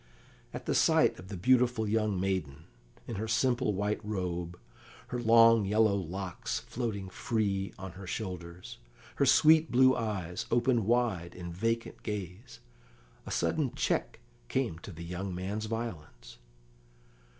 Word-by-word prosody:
At -, -, -7 dB
the -, -, 0 dB
sight -, -, +3 dB
of 90 Hz, -, -11 dB
the 100 Hz, -1 st, -6 dB
beautiful 125 Hz, +1 st, +3 dB
young 105 Hz, -2 st, +1 dB
maiden, 90 Hz, -6 st, -2 dB, 0.4 s
in 115 Hz, -, -5 dB
her 110 Hz, +3 st, -3 dB
simple 120 Hz, 0 st, +1 dB
white 105 Hz, +2 st, -1 dB
robe, 90 Hz, -4 st, -3 dB, 0.5 s
her 125 Hz, -, -3 dB
long 115 Hz, -1 st, +6 dB
yellow 105 Hz, +1 st, +3 dB
locks 95 Hz, +6 st, -4 dB
floating 115 Hz, -4 st, -4 dB
free 100 Hz, -1 st, -1 dB
on 95 Hz, -1 st, -7 dB
her 95 Hz, +2 st, -10 dB
shoulders, 90 Hz, -3 st, -6 dB, 0.4 s
her -, -, +3 dB
sweet 160 Hz, +1 st, +6 dB
blue 130 Hz, +1 st, +5 dB
eyes 95 Hz, -6 st, -3 dB
opened 120 Hz, -3 st, +2 dB
wide 110 Hz, -8 st, 0 dB
in 85 Hz, -1 st, -7 dB
vacant 115 Hz, +5 st, -2 dB
gaze, 95 Hz, -, -6 dB, 0.7 s
a -, -, -5 dB
sudden -, -, 0 dB
check -, -, -1 dB, 0.3 s
came 80 Hz, +6 st, -1 dB
to -, -, -9 dB
the 85 Hz, +1 st, -9 dB
young 90 Hz, +2 st, -4 dB
man's 100 Hz, +4 st, -3 dB
violence. 75 Hz, -, -6 dB
105 Hz, 140 wpm, -30 LUFS, 90-115 Hz, 0.7 s, long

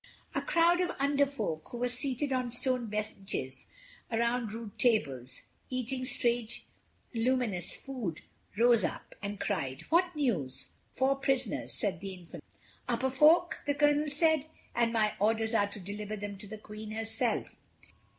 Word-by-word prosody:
A -, -, 0 dB
crowd 345 Hz, +1 st, +4 dB
of 355 Hz, -1 st, -1 dB
Under 280 Hz, +1 st, +3 dB
Folk, 165 Hz, -, -3 dB
who 240 Hz, -, -6 dB
were 245 Hz, +1 st, +1 dB
seated 265 Hz, +2 st, -1 dB
on 250 Hz, -2 st, 0 dB
stone 250 Hz, 0 st, 0 dB
benches 200 Hz, -9 st, -4 dB, 0.4 s
around 235 Hz, 0 st, +1 dB
rude 220 Hz, -2 st, -7 dB
tables, 135 Hz, -, +1 dB, 0.3 s
eating 255 Hz, 0 st, -2 dB
strange 240 Hz, -2 st, 0 dB, 0.5 s
luminous 230 Hz, -6 st, 0 dB
food, 240 Hz, -, -5 dB, 0.3 s
rose 235 Hz, -2 st, +5 dB
up, -, -, -3 dB
and 200 Hz, 0 st, -4 dB
cried, 140 Hz, -10 st, -2 dB
"What 350 Hz, +1 st, +4 dB
news?" 185 Hz, -, -1 dB, 0.2 s
"Four 270 Hz, +1 st, +2 dB
prisoners," 270 Hz, -3 st, 0 dB
said 190 Hz, -4 st, -1 dB
the 195 Hz, -1 st, -5 dB
Infantryman. 175 Hz, -2 st, -10 dB, 0.5 s
"Upper 265 Hz, -1 st, +1 dB
Folk," 315 Hz, +5 st, +5 dB
the 285 Hz, -, +2 dB
Colonel 295 Hz, +1 st, +3 dB
said; 315 Hz, 0 st, +3 dB, 0.3 s
"and 235 Hz, -1 st, +2 dB
my 215 Hz, -2 st, +2 dB
orders 220 Hz, +2 st, +2 dB
are 205 Hz, -2 st, +4 dB
to 205 Hz, +1 st, -8 dB
deliver 205 Hz, +2 st, -5 dB
them 205 Hz, -1 st, -5 dB
to 210 Hz, -, -9 dB
the 215 Hz, +2 st, -7 dB
Queen 215 Hz, 0 st, -9 dB
herself." 225 Hz, +1 st, -1 dB
235 Hz, 150 wpm, -31 LUFS, 205-270 Hz, 0.5 s, rose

